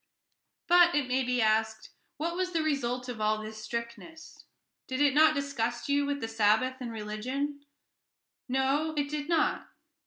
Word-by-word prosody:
But, 350 Hz, -1 st, +5 dB
it 290 Hz, -3 st, +1 dB
may 255 Hz, +1 st, +1 dB
be 250 Hz, -1 st, +1 dB
asked, 220 Hz, 0 st, 0 dB, 0.3 s
what 335 Hz, +3 st, -2 dB
was 365 Hz, 0 st, -2 dB
the 325 Hz, -2 st, +1 dB
result 250 Hz, -4 st, -1 dB
of 240 Hz, -3 st, -6 dB
all 215 Hz, 0 st, +2 dB
this 215 Hz, 0 st, -8 dB
strictness? 235 Hz, +8 st, -7 dB, 0.4 s
Did 260 Hz, +1 st, -3 dB
it 290 Hz, -2 st, +4 dB
not 310 Hz, +1 st, +5 dB
disgust 275 Hz, -3 st, -2 dB
you 285 Hz, 0 st, +2 dB
with 285 Hz, -1 st, -2 dB
the 225 Hz, -, -2 dB
Sabbath 225 Hz, +4 st, +2 dB
and 245 Hz, -2 st, -5 dB
with 225 Hz, -, -6 dB
religion? 260 Hz, +8 st, -4 dB, 0.9 s
No, 275 Hz, +5 st, 0 dB
it 285 Hz, -1 st, 0 dB
did 300 Hz, +1 st, -4 dB
not. 330 Hz, -2 st, +1 dB
260 Hz, 165 wpm, -29 LUFS, 225-295 Hz, 0.9 s, But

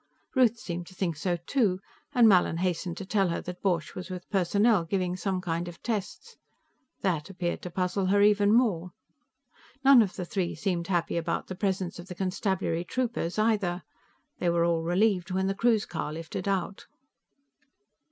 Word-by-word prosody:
Ruth 245 Hz, -3 st, +4 dB
seemed 175 Hz, -5 st, -5 dB
to 185 Hz, -, -14 dB
think 175 Hz, -4 st, -1 dB
so, 175 Hz, +4 st, -1 dB
too, 215 Hz, -10 st, +1 dB, 0.3 s
and 245 Hz, -5 st, +6 dB
Mallin 180 Hz, -5 st, +4 dB
hastened 175 Hz, -1 st, -2 dB
to 195 Hz, -, -6 dB
tell 195 Hz, -1 st, +2 dB
her 170 Hz, -, -1 dB
that 180 Hz, 0 st, -8 dB
Borch 175 Hz, -5 st, 0 dB
was 180 Hz, 0 st, -7 dB
with 180 Hz, -1 st, -7 dB
Personnel, 200 Hz, +1 st, +3 dB
giving 180 Hz, +1 st, -1 dB
some 185 Hz, 0 st, -2 dB
kind 170 Hz, -1 st, -2 dB
of 170 Hz, -2 st, -10 dB
tests. 230 Hz, -, -4 dB, 0.6 s
That 170 Hz, -4 st, -1 dB
appeared 175 Hz, -2 st, -3 dB
to 180 Hz, -, -6 dB
puzzle 185 Hz, +1 st, -1 dB
her 200 Hz, +2 st, +3 dB
even 205 Hz, 0 st, +4 dB
more. 190 Hz, -7 st, +2 dB, 0.9 s
None 270 Hz, -2 st, +8 dB
of 195 Hz, -4 st, -1 dB
the 180 Hz, -, -4 dB
three 180 Hz, -1 st, -2 dB
seemed 175 Hz, -4 st, -2 dB
happy 175 Hz, -3 st, 0 dB
about 165 Hz, -, -1 dB
the 185 Hz, -, -6 dB
presence 190 Hz, -2 st, -2 dB
of 175 Hz, -, -9 dB
the 180 Hz, -, -7 dB
constabulary 190 Hz, -2 st, -1 dB
troopers, 230 Hz, -5 st, -2 dB
either; 205 Hz, -5 st, +1 dB, 0.6 s
they 175 Hz, -, +1 dB
were 170 Hz, 0 st, +2 dB
all 170 Hz, -1 st, +1 dB
relieved 180 Hz, +2 st, +1 dB
when 190 Hz, +1 st, 0 dB
the 195 Hz, -, +1 dB
cruise 225 Hz, +1 st, +2 dB
car 160 Hz, -3 st, -4 dB
lifted 165 Hz, +4 st, -5 dB
out. 195 Hz, 0 st, -2 dB
185 Hz, 175 wpm, -28 LUFS, 175-205 Hz, 0.9 s, None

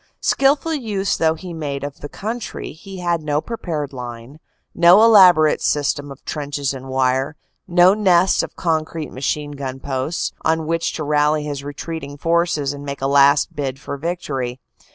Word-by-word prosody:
Skilful 285 Hz, +4 st, +2 dB
use 210 Hz, -9 st, -1 dB
though 160 Hz, 0 st, +2 dB
he 175 Hz, +1 st, -8 dB
made 145 Hz, -4 st, -4 dB
of 145 Hz, -1 st, -6 dB
the 145 Hz, -, -8 dB
country, 225 Hz, +7 st, -5 dB
he 190 Hz, +3 st, -10 dB
had 170 Hz, -2 st, 0 dB
no 150 Hz, -1 st, 0 dB
prepared 155 Hz, -, -4 dB
line, 125 Hz, +2 st, -8 dB, 0.3 s
no 175 Hz, +5 st, +6 dB
elaborate 180 Hz, -9 st, +6 dB
system 145 Hz, -1 st, 0 dB
of 135 Hz, -, -13 dB
trenches 145 Hz, -2 st, -3 dB
and 130 Hz, 0 st, -9 dB
wire, 130 Hz, +2 st, 0 dB, 0.3 s
no 175 Hz, +2 st, +5 dB
nests 190 Hz, -3 st, +3 dB
of -, -, -7 dB
concrete 160 Hz, -2 st, -2 dB
machine 145 Hz, +3 st, -3 dB
gun 135 Hz, -2 st, -6 dB
posts, 135 Hz, +4 st, -2 dB
on 160 Hz, 0 st, +1 dB
which 165 Hz, +1 st, -1 dB
to 155 Hz, -, -4 dB
rally 150 Hz, +1 st, +2 dB
his 145 Hz, -2 st, -5 dB
retreating 145 Hz, 0 st, -6 dB
forces 165 Hz, -3 st, 0 dB
and 145 Hz, 0 st, -9 dB
make 140 Hz, -1 st, -6 dB
a -, -, +1 dB
last 140 Hz, +1 st, +4 dB
bid 135 Hz, -2 st, -3 dB
for 140 Hz, -, -6 dB
victory. 140 Hz, -6 st, -4 dB
150 Hz, 165 wpm, -20 LUFS, 140-175 Hz, 0.3 s, no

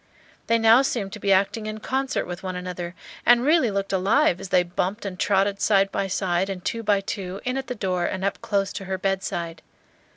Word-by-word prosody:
They 230 Hz, -, +4 dB
now 225 Hz, +2 st, +6 dB
seemed 220 Hz, -7 st, -2 dB
to 215 Hz, -, -7 dB
be 200 Hz, -1 st, 0 dB
acting 200 Hz, +3 st, +2 dB
in 215 Hz, 0 st, -5 dB
concert 265 Hz, +4 st, -1 dB
with 175 Hz, 0 st, -6 dB
one 185 Hz, -1 st, -4 dB
another, 180 Hz, -1 st, -5 dB, 0.3 s
and 240 Hz, 0 st, +5 dB
really 305 Hz, -5 st, +4 dB
looked 195 Hz, -1 st, -2 dB
alive 195 Hz, -, +3 dB
as 195 Hz, -, -7 dB
they 180 Hz, -, +4 dB
bumped 185 Hz, +4 st, -3 dB
and 185 Hz, -2 st, -5 dB
trotted 200 Hz, 0 st, +1 dB
side 195 Hz, -2 st, +3 dB
by 195 Hz, -, -1 dB
side, 190 Hz, 0 st, 0 dB
and 180 Hz, -2 st, -6 dB
two 230 Hz, -, -2 dB
by 205 Hz, -2 st, +2 dB
two, 195 Hz, -1 st, -5 dB
in 250 Hz, +1 st, -1 dB
at 270 Hz, -1 st, -3 dB
the 250 Hz, -, -4 dB
door 185 Hz, -4 st, -1 dB
and 190 Hz, 0 st, -3 dB
up 200 Hz, -, -2 dB
close 200 Hz, -3 st, -1 dB
to 195 Hz, -, -6 dB
her 190 Hz, 0 st, -2 dB
bedside. 180 Hz, -3 st, -2 dB
195 Hz, 220 wpm, -24 LUFS, 185-220 Hz, 0.3 s, now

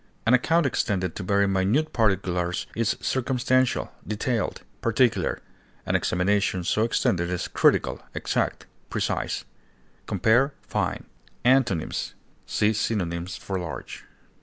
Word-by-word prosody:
An 115 Hz, -, +4 dB
account 165 Hz, +7 st, +3 dB
extended 95 Hz, -8 st, 0 dB
to -, -, -4 dB
very 100 Hz, +1 st, +2 dB
minute 100 Hz, +12 st, +1 dB
particulars 90 Hz, -5 st, +1 dB
is 115 Hz, -1 st, +1 dB
circumstantial, 130 Hz, 0 st, +1 dB, 0.2 s
detailed, 110 Hz, +3 st, -1 dB, 0.2 s
particular; 115 Hz, +1 st, +2 dB, 0.5 s
an -, -, 0 dB
examination 95 Hz, 0 st, +1 dB
so 105 Hz, -, +1 dB
extended 85 Hz, -6 st, +1 dB
is 90 Hz, -1 st, -2 dB
critical, -, -, +2 dB
exact, -, -, -1 dB, 0.2 s
precise. -, -, -2 dB, 0.6 s
Compare 115 Hz, +9 st, +3 dB
FINE. -, -, -2 dB, 0.4 s
Antonyms: 125 Hz, -10 st, +2 dB, 0.3 s
See 105 Hz, +1 st, +2 dB
synonyms 90 Hz, -5 st, -2 dB
for 95 Hz, -1 st, -4 dB
LARGE. 80 Hz, -6 st, -7 dB
105 Hz, 110 wpm, -25 LUFS, 90-120 Hz, 0.6 s, An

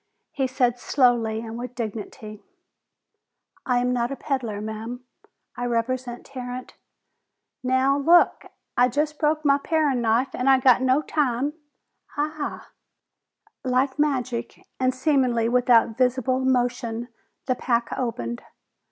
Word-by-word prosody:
He 270 Hz, -2 st, -1 dB
said 250 Hz, -2 st, +1 dB
slowly 240 Hz, -5 st, +2 dB
and 230 Hz, 0 st, -7 dB
with 250 Hz, 0 st, -7 dB
dignity, 215 Hz, -1 st, -6 dB, 1.3 s
"I 250 Hz, -1 st, +2 dB
am 250 Hz, 0 st, +1 dB
not 240 Hz, -1 st, 0 dB
a -, -, -2 dB
peddler, 255 Hz, -8 st, -3 dB
ma'am. 220 Hz, +4 st, -6 dB, 0.5 s
I 245 Hz, -, -3 dB
represent 245 Hz, +1 st, -2 dB
Tarrant 255 Hz, -1 st, -7 dB, 0.5 s
" -, -, -57 dB
"Now, 260 Hz, +2 st, +2 dB
look! 340 Hz, +5 st, +4 dB, 0.3 s
I 245 Hz, -, +5 dB
just 300 Hz, +4 st, -1 dB
broke 310 Hz, 0 st, +1 dB
my 280 Hz, 0 st, +4 dB
parin' 290 Hz, -5 st, +1 dB
knife 235 Hz, +3 st, +1 dB
an' 250 Hz, -, -2 dB
I 265 Hz, -1 st, +6 dB
got 255 Hz, -1 st, +5 dB
no 260 Hz, +3 st, +2 dB
time 280 Hz, -2 st, 0 dB, 0.3 s
" -, -, -27 dB
"Ah!" 300 Hz, 0 st, -4 dB, 0.9 s
Like 260 Hz, +2 st, 0 dB
magic, 255 Hz, -5 st, -1 dB
and 255 Hz, 0 st, +2 dB
seemingly 255 Hz, -4 st, +1 dB
without 240 Hz, -2 st, +3 dB
visible 255 Hz, 0 st, +2 dB
motion, 245 Hz, -2 st, 0 dB, 0.4 s
the 255 Hz, -, +1 dB
pack 240 Hz, -2 st, 0 dB
opened. 120 Hz, -, -3 dB
250 Hz, 130 wpm, -24 LUFS, 235-270 Hz, 1.3 s, I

